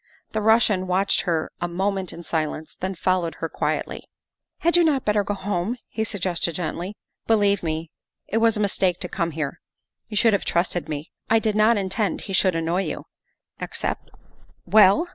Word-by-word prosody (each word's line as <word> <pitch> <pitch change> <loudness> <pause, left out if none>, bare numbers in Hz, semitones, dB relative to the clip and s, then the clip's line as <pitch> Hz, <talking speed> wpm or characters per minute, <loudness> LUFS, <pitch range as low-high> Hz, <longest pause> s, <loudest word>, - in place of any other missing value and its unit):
The 215 - -1
Russian 215 -4 +3
watched 190 +2 +2
her 160 -2 0
a 175 - 0
moment 190 +1 -1
in 170 - -9
silence, 155 -1 -2
then 190 +1 -3
followed 180 -2 0
her - - -3
quietly. - - -2 0.3
" - - -63
Had 340 +1 +3
you 350 - +6
not 290 -5 +2
better 210 -1 +3
go 205 - -2
home?" 195 +3 -2
he 220 - -2
suggested 180 -5 -1
gently. 175 +4 -3
' - - -56
' - - -46
Believe 205 -3 +3
me, 160 -1 -3 0.4
it 220 - -1
was 225 -1 +4
a - - 0
mistake 190 -3 +1
to 180 - -2
come 170 -1 -1
here. 155 -3 -4 0.5
You 210 - -4
should 225 +1 +5
have 200 - +1
trusted 175 -1 0
me. 150 +1 -5 0.2
I 225 - +5
did 220 -2 +1
not 215 +2 +5
intend 200 +2 -1
he 195 - -6
should 185 -1 +3
annoy 165 +3 0
you, 155 - -5 0.5
except - - -3 0.3
" - - -31
Well?" 210 - +7
190 Hz, 195 wpm, -24 LUFS, 170-215 Hz, 0.5 s, Well